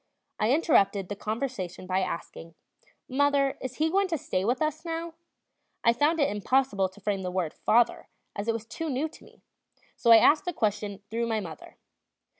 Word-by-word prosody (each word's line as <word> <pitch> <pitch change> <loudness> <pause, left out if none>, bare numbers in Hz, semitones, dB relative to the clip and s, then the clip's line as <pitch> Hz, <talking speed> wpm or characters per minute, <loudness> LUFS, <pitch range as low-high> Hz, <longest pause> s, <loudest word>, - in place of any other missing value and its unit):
I 215 - +2
interrupted 210 - +3
the 205 - -3
conversation 215 -5 -4
by 185 +1 0
asking: 170 -2 -5 0.5
"Mother, 280 0 +2
is 255 -1 -5
he 315 +1 +1
going 395 +1 +2
to 335 -3 -1
stay 185 -8 -2
with 245 +5 +1
us 310 0 -1
now?" 330 0 -4 0.7
I 235 - +5
found 295 +7 +2
it 285 - +4
impossible 205 -2 +1
to 190 +3 -17
frame 200 -1 -2
the 185 - -3
word 180 -4 -2
"father"; 235 +1 +2 0.3
it 205 +1 -4
was 225 -1 -4
too 315 +8 -5
new 280 +3 -1
to 325 - -16
me; - - -20 0.5
so 235 - 0
I 230 - +11
asked 300 - +5
the 355 - -2
question 205 -4 -2
through 230 +1 -1
my 225 -1 0
mother. 165 -6 -9
230 Hz, 185 wpm, -27 LUFS, 200-285 Hz, 0.7 s, I